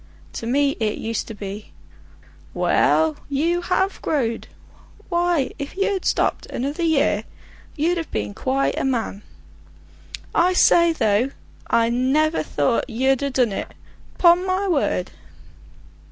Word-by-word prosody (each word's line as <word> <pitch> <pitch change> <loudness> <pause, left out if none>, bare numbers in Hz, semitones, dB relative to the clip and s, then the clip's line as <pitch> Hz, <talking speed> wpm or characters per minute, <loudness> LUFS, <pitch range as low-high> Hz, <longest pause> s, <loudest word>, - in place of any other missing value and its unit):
To 230 - -5
me 280 +3 +2
it 215 -2 -1
used 225 0 -3
to 225 - -7
be: 205 +1 -8 0.8
"Well, 315 -2 +2
you 330 +5 0
have 380 +2 -1
growed! 235 -7 -1 0.6
Why, 345 -5 +1
if 285 +5 -6
you'd 395 -1 0
stopped - - 0
another 285 +6 -3
year 290 -10 +2 0.5
you'd 335 +4 +1
have 330 - -4
been 105 -1 -3
quite 270 - -1
a - - -1
man. 230 -6 -2 1.1
I 360 +2 +3
say, 340 -1 +5
though 225 -4 +1 0.4
I 230 0 +2
never 270 +6 +1
thought 240 - 0
you'd 265 +3 +1
ha' 280 - 0
done 250 -4 +2
it; - - -4 0.5
'pon 345 0 +5
my 375 +2 0
word!" 280 - 0
280 Hz, 130 wpm, -22 LUFS, 230-340 Hz, 1.1 s, say